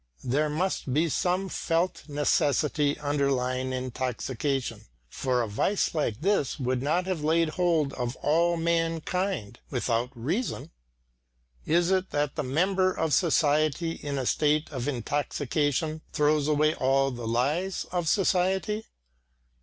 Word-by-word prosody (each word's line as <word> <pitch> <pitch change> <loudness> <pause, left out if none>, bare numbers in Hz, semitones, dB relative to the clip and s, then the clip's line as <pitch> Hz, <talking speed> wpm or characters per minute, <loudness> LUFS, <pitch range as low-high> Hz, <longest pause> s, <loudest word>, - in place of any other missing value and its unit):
There 145 +5 +1
must 160 -2 -1
be 160 +2 +2
some 180 +5 0
felt 170 -1 -1
necessity 145 0 +1
underlying 135 -3 0
intoxication, 130 +1 -3 0.2
for 125 - 0
a - - -3
vice 190 - 0
like 145 -7 -1
this 190 -8 +1
would 130 -1 0
not 160 +6 +1
have 185 -5 -2
laid 165 +1 +2
hold 160 -4 +1
of 125 0 -3
all 170 +3 +2
mankind 165 - -1
without 120 -1 0
reason. 165 - -3 1.0
Is 175 +2 +3
it 185 0 +1
that 145 -1 -1
the - - -1
member 185 +8 +2
of 160 -4 -1
society 155 0 +2
in 145 -3 -4
a 130 - -2
state 150 +4 +1
of 130 -2 -4
intoxication 145 +3 -1
throws 150 0 +2
away 155 0 +3
all 135 +1 +2
the 120 -2 -6
lies 145 +11 0
of 175 -2 -1
society? 190 +3 +1
150 Hz, 130 wpm, -27 LUFS, 130-170 Hz, 1.0 s, Is